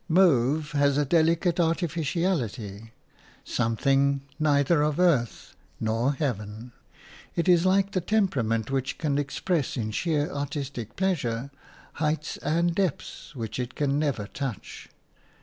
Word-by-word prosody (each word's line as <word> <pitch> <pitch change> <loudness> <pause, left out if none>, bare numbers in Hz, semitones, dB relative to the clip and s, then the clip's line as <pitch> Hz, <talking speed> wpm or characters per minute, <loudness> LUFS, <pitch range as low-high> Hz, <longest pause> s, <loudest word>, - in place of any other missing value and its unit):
Mauve 155 -3 +3
has 140 -1 +2
a 145 - +2
delicate 165 +3 +2
artificiality, 160 - -1 0.5
something 135 +4 +1 0.2
neither 145 +1 +3
of 150 +1 0
earth 150 -11 +1 0.2
nor 115 +5 +1
heaven. 115 -4 -4 0.6
It 170 - 0
is 175 0 +5
like 195 +1 +3
the 185 - 0
temperament 135 - 0
which 135 -1 -1
can 145 -3 0
express 145 +2 -1
in 110 -2 -2
sheer 150 +4 0
artistic 140 - -4
pleasure 140 -9 -1 0.5
heights 155 0 -1
and 170 +2 +1
depths 170 -3 -3
which 115 -1 -5
it 125 0 -4
can 145 -1 +1
never 140 -9 -1
touch. 125 0 -6
145 Hz, 120 wpm, -26 LUFS, 125-170 Hz, 0.6 s, is